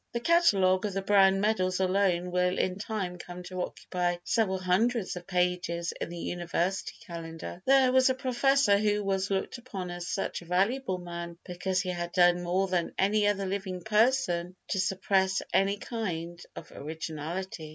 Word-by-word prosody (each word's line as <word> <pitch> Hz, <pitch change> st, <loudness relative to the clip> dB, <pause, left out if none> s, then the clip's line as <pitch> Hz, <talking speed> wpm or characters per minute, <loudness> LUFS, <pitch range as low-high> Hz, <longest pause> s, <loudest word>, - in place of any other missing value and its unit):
The 235 Hz, -, -1 dB
catalogue 200 Hz, -, +4 dB
of 200 Hz, -, -5 dB
the 195 Hz, 0 st, -2 dB
Browne 195 Hz, -1 st, +5 dB
medals 185 Hz, -4 st, +1 dB
alone 185 Hz, -2 st, +1 dB
will 180 Hz, 0 st, +1 dB
in 185 Hz, +1 st, -1 dB
time 195 Hz, -5 st, -4 dB
come 175 Hz, +1 st, -8 dB
to 180 Hz, 0 st, -5 dB
occupy 175 Hz, -1 st, -2 dB
several 195 Hz, -4 st, +1 dB
hundreds 190 Hz, +4 st, +1 dB
of 180 Hz, 0 st, -8 dB
pages 180 Hz, -2 st, 0 dB
in -, -, -2 dB
the 175 Hz, -, -7 dB
University 175 Hz, +2 st, -2 dB
Calendar. 165 Hz, 0 st, -7 dB
There 265 Hz, -1 st, +5 dB
was 260 Hz, 0 st, +5 dB
a 260 Hz, -, +1 dB
professor 260 Hz, -4 st, +3 dB
who 210 Hz, 0 st, +1 dB
was 195 Hz, -1 st, 0 dB
looked 195 Hz, +5 st, -2 dB
upon 195 Hz, -8 st, -6 dB
as 175 Hz, 0 st, -6 dB
such 195 Hz, -, -2 dB
a -, -, -12 dB
valuable 195 Hz, +5 st, 0 dB
man 170 Hz, -1 st, -7 dB
because 185 Hz, +1 st, -1 dB
he 185 Hz, -, -4 dB
had 175 Hz, -1 st, -4 dB
done 175 Hz, 0 st, +4 dB
more 180 Hz, +2 st, 0 dB
than 180 Hz, -2 st, -1 dB
any 205 Hz, +2 st, +3 dB
other 200 Hz, -1 st, 0 dB
living 190 Hz, -1 st, -3 dB
person 215 Hz, -6 st, +2 dB
to 195 Hz, -, 0 dB
suppress 190 Hz, 0 st, +1 dB
any 195 Hz, +1 st, +3 dB
kind 175 Hz, -7 st, -4 dB
of -, -, -10 dB
originality. 160 Hz, +2 st, -5 dB
185 Hz, 170 wpm, -29 LUFS, 175-205 Hz, -, Browne